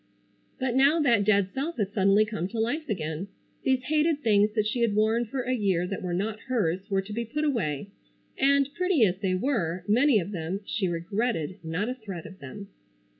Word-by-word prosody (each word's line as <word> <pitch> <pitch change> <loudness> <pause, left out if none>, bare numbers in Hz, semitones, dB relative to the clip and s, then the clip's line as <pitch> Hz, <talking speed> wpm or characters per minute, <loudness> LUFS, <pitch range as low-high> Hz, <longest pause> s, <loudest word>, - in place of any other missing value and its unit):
But 260 -2 -1
now 280 +5 +5
that 240 -9 +3
dead 200 -2 +2
self 305 +6 -3
had 205 -2 -1
suddenly 200 +1 +4
come 210 -5 -3
to 225 +3 -5
life 280 +7 -1
again. 160 -2 -3 0.3
These 260 -1 +1
hated 305 +2 +1
things 210 -2 +4
that 215 -2 +2
she 215 +3 -1
had 230 -3 +2
worn 220 +3 +2
for 255 +3 -3
a 255 - -1
year 195 -7 +1
that 195 +1 -4
were 180 - -3
not 210 +3 -2
hers 195 -5 0
were 195 -1 +1
to 210 +2 -8
be 235 +2 -2
put 300 +7 -3
away, 200 - -1 0.4
and, 275 0 +3
pretty 355 -7 +3
as 185 -1 -1
they 190 -2 0
were, 185 - -1
many 245 +4 +4
of 190 +2 -5
them, 180 +1 -3
she 200 -2 -1
regretted 185 +1 -2
not 165 +6 -2
a 250 - -1
thread 200 -9 -8
of 190 - -11
them. 195 +9 -9
215 Hz, 205 wpm, -27 LUFS, 190-255 Hz, 0.4 s, now